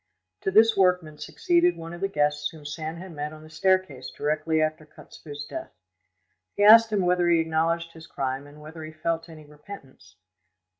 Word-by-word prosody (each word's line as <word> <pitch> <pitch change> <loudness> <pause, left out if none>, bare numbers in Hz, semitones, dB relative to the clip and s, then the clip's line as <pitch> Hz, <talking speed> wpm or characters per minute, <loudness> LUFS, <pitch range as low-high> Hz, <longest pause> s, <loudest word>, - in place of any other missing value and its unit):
To - - -1
this 220 +3 +5
workman 180 -5 +1
succeeded 350 - +1
one 165 +1 -8
of 175 - -9
the 195 - +1
guests 150 -4 0
whom 155 -2 -14
Sand 155 +2 -5
had 185 +1 -9
met 150 -1 -5
on 155 0 -13
the 155 - -15
staircase 160 -6 0
directly 155 +2 -1
after 155 0 -1
Kotzebue's 145 -1 -11
death. - - -8 0.8
He 205 - +1
asked 225 +2 +8
him 200 -4 +1
whether 175 -1 +2
he 170 -1 +4
acknowledged 165 +1 0
his 160 0 -13
crime 135 +1 -4
and 145 +1 -15
whether 155 +1 -10
he 155 0 -9
felt 165 +1 -3
any 155 -2 -12
repentance. 145 - -14
160 Hz, 185 wpm, -25 LUFS, 150-180 Hz, 0.8 s, asked